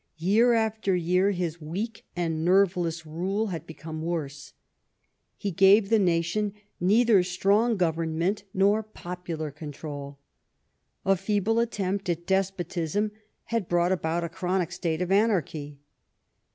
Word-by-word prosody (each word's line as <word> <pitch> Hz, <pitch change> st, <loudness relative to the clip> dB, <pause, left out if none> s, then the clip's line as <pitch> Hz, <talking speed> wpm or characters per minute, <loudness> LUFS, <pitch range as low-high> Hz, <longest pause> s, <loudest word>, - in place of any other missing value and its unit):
Year 215 Hz, +9 st, +4 dB
after 220 Hz, -4 st, +1 dB
year 180 Hz, +3 st, +2 dB
his 175 Hz, -4 st, -2 dB
weak 195 Hz, +9 st, -5 dB
and 165 Hz, -3 st, -1 dB
nerveless 175 Hz, -3 st, +2 dB
rule 190 Hz, +8 st, -2 dB
had 165 Hz, -, -6 dB
become 160 Hz, 0 st, -7 dB
worse. 150 Hz, -4 st, -4 dB, 0.8 s
He 200 Hz, -, -3 dB
gave 195 Hz, +4 st, +5 dB
the 225 Hz, -, +5 dB
nation 185 Hz, +3 st, +1 dB, 0.3 s
neither 210 Hz, +2 st, +4 dB
strong 200 Hz, +6 st, +2 dB
government 165 Hz, +2 st, 0 dB
nor 200 Hz, +3 st, +3 dB
popular 175 Hz, -6 st, -6 dB
control. 145 Hz, -1 st, -7 dB, 0.9 s
A 195 Hz, 0 st, +4 dB
feeble 205 Hz, +3 st, 0 dB
attempt 200 Hz, -4 st, -1 dB
at 170 Hz, 0 st, -2 dB
despotism 190 Hz, 0 st, -1 dB, 0.4 s
had 225 Hz, -6 st, 0 dB
brought 175 Hz, +1 st, +2 dB
about 170 Hz, -2 st, 0 dB
a 170 Hz, -, -3 dB
chronic 180 Hz, +1 st, -1 dB
state 165 Hz, 0 st, -1 dB
of 180 Hz, -, -4 dB
anarchy. 170 Hz, -9 st, +1 dB
180 Hz, 125 wpm, -27 LUFS, 165-200 Hz, 0.9 s, gave